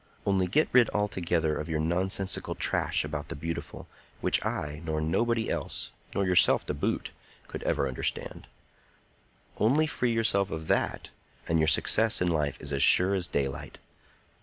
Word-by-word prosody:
Only 95 -2 +1
get 150 - +2
rid 125 -3 +5
altogether 85 -6 0
of 75 - -5
your 80 - -1
nonsensical 95 +4 -1
trash - - 0
about 75 -1 -5
the - - -6
beautiful, 80 +3 -6 0.3
which - - +1
I 75 +1 -4
nor 80 -1 -2
nobody 115 +9 0
else, - - -3 0.2
nor 100 - +1
yourself 90 -1 +5
to - - -3
boot, 70 - -2 0.4
could - - -7
ever 70 - 0
understand,—only 110 - -4
free 125 -5 -1
yourself 105 -4 +1
of 80 0 -6
that, - - -1 0.4
and 80 0 +1
your 80 - +2
success 110 +7 +3
in 90 - +1
life 75 -4 -1
is 70 -1 -5
as 70 - 0
sure 95 +2 +6
as 95 -2 0
daylight. 70 -1 -3
85 Hz, 155 wpm, -28 LUFS, 75-100 Hz, 0.4 s, sure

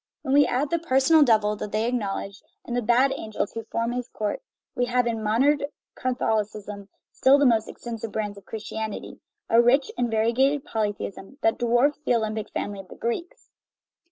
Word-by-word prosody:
When 265 - -1
we 285 0 +6
add 275 +4 -1
the 335 - +1
"personal 310 +1 +4
Devil" 215 -6 +4
that 205 - -5
they 215 +1 0
acknowledge, 200 -4 -3 0.2
and 240 - -4
the 245 - +1
"bad 245 +4 +3
angels" 215 -5 -3
who 225 -1 -6
form 230 +1 -2
his 250 0 -4
court, 210 -1 -3 0.3
we 245 - 0
have 245 0 +1
in 230 -2 -1
modern 255 +8 +3 0.3
Catholicism, 210 -5 -2 0.2
still 270 +2 +5
the 285 - +3
most 225 -3 +3
extensive 230 -2 -6
branch 210 -2 -3
of 200 -1 -14
Christianity, 220 -1 -6 0.3
a 230 +1 +5
rich 260 +3 +3
and 245 -1 +1
variegated 245 +6 +2
polytheism 205 +2 -4
that 225 - +2
dwarfs 240 +5 +2
the 250 - +2
Olympic 220 -1 -2
family 205 -1 -4
of 195 - -10
the - - -12
Greeks. 235 +10 -5
230 Hz, 180 wpm, -25 LUFS, 215-255 Hz, 0.3 s, we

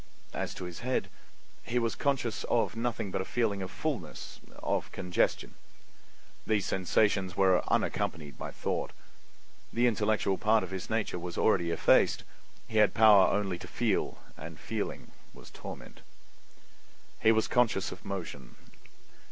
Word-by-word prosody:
As - - -3
to - - -6
his 90 -2 -6
head, 130 +1 -1 0.5
he 120 - -2
was 115 -1 +1
conscious 130 -6 -1
of 115 -1 +1
nothing 115 -4 -2
but 95 - -1
a - - -2
feeling 105 -2 0
of 95 - -4
fullness—of 125 - -4
congestion. 90 -1 0 0.9
These 105 -3 +1
sensations 95 0 +1
were 95 -2 +4
unaccompanied 75 -5 -1
by - - -6
thought. - - -3 0.8
The 120 +1 +2
intellectual 105 -4 +1
part 110 0 +3
of 95 - -7
his 95 -1 -5
nature 110 -5 -1
was 85 0 -6
already 90 -6 +3
effaced; 85 - +3 0.4
he 110 -2 +1
had 105 - +4
power 105 -4 +7
only 95 -4 0
to - - -9
feel, - - 0 0.2
and 80 0 -9
feeling 110 -1 -4 0.2
was - - -13
torment. - - -10 1.2
He 110 - +5
was 110 0 +2
conscious 120 -6 +2
of 90 - -10
motion. 95 -4 -6
105 Hz, 140 wpm, -30 LUFS, 95-115 Hz, 1.2 s, power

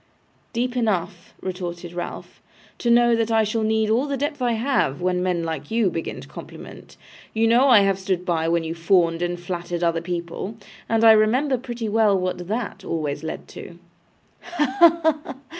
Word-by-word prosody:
'Deep 245 +1 -2
enough,' 190 -7 -2
retorted 175 -2 -5
Ralph, 175 - -7 0.4
'to 240 - -1
know 240 0 +5
that 230 0 0
I 225 -1 +3
shall 215 +2 -1
need 220 0 +1
all 250 +6 +2
the 280 -1 -2
depth 290 +1 -3
I 240 -1 +1
have, 225 - 0
when 180 0 0
men 180 -2 0
like 160 -3 -5
you 225 -4 +1
begin 165 - -4
to - - -12
compliment. - - -11 0.4
You 225 +1 +2
know 240 +4 +4
I 230 -5 +7
have 195 -1 +1
stood 185 -2 -2
by 165 -3 0
when 170 0 +1
you 160 0 -4
fawned 165 0 +2
and 175 0 -2
flattered 175 -1 -4
other 165 -1 +1
people, 175 +4 -5 0.3
and 225 0 +2
I 225 - +9
remember 240 +6 +3
pretty 240 -2 -5
well 210 -2 +3
what 180 -1 -3
THAT 210 -2 -4
always 155 -4 -3
led 160 - -6
to.' 170 - -10 0.6
'Ha, 300 -7 -2
ha, 325 -2 +5
ha! 270 - -8
200 Hz, 185 wpm, -23 LUFS, 175-235 Hz, 0.6 s, I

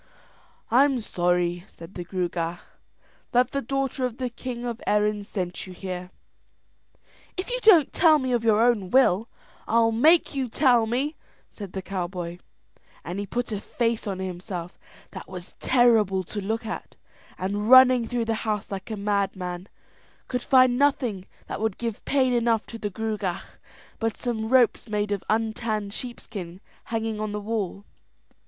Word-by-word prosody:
"I'm 265 +2 +4
sorry," 175 -3 0
said 165 +3 -13
the 175 - -5
Gruagach, 175 -1 -2 0.7
"that 245 +1 +3
the 275 - -1
daughter 270 +1 -2
of 250 -2 -2
the 255 -2 -3
king 245 0 -6
of 235 -1 -4
Erin 210 0 +2
sent 185 -3 -4
you 185 - -9
here." 180 -1 -6 1.3
"If 370 +6 -3
you - - 0
don't 355 - +6
tell 320 -3 +6
me 260 -3 -2
of 240 -2 +1
your 220 -1 +4
own 225 -6 +2
will, 230 -4 +3 0.4
I'll 230 0 +3
make 310 +11 +4
you 265 -3 -2
tell 245 -3 +3
me," 270 +7 -1 0.3
said 200 -4 -9
the 190 - -4
cowboy; 180 -2 -4 0.7
and 175 +5 -4
he 205 - -4
put 245 +2 -3
a 205 -2 -3
face 230 -1 -1
on 195 -2 -2
himself 180 -1 -6 0.3
that - - -9
was 180 -1 -9
terrible 225 -7 +3
to 205 +4 -5
look 225 +3 -2
at, 220 - -6 0.4
and 205 +3 -2
running 255 -2 +8
through 240 -1 -1
the 225 - 0
house 210 -2 -2
like 195 +1 -5
a 220 - -4
madman, 195 -3 -2 0.6
could 250 -1 -2
find 255 -1 +4
nothing 250 -9 +1 0.2
that - - -5
would 220 -3 -1
give 230 -3 -4
pain 260 -3 +2
enough 230 -2 +2
to 230 - -9
the 205 - -2
Gruagach 210 -3 -3 0.5
but 225 -1 -1
some 220 -3 -3
ropes 245 -2 +3
made 210 -1 -1
of 200 -2 -1
untanned 220 -2 -1
sheepskin 200 -7 -7 0.3
hanging 225 -1 -2
on 215 -1 -3
the 210 - -2
wall. 205 -2 -3
220 Hz, 160 wpm, -25 LUFS, 190-245 Hz, 1.3 s, running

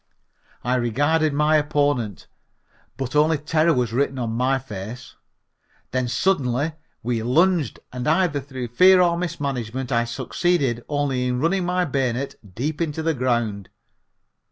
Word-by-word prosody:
I 125 +2 +1
regarded 145 +7 +1
my 150 +2 +3
opponent, 145 - 0 0.7
but 135 +1 -4
only 155 +1 +4
terror 155 +3 +2
was 120 -3 0
written 135 +1 0
on 120 -3 -2
my 130 +4 +1
face. 120 0 -8 0.8
Then 130 0 0
suddenly 140 -1 +1 0.3
we 115 -1 -1
lunged 155 - +2
and 125 -1 -4
either 160 -2 +2
through 130 -3 -6
fear 185 +10 +6
or 175 -1 +4
mismanagement 135 -7 -3
I 120 -1 +2
succeeded 130 0 0
only 140 -4 0
in 125 0 -1
running 175 +5 +1
my 180 0 +1
bayonet 135 -2 -1 0.2
deep 150 +7 -2
into 160 -1 -2
the 165 0 +1
ground. 120 -7 -1
135 Hz, 135 wpm, -23 LUFS, 120-155 Hz, 0.8 s, fear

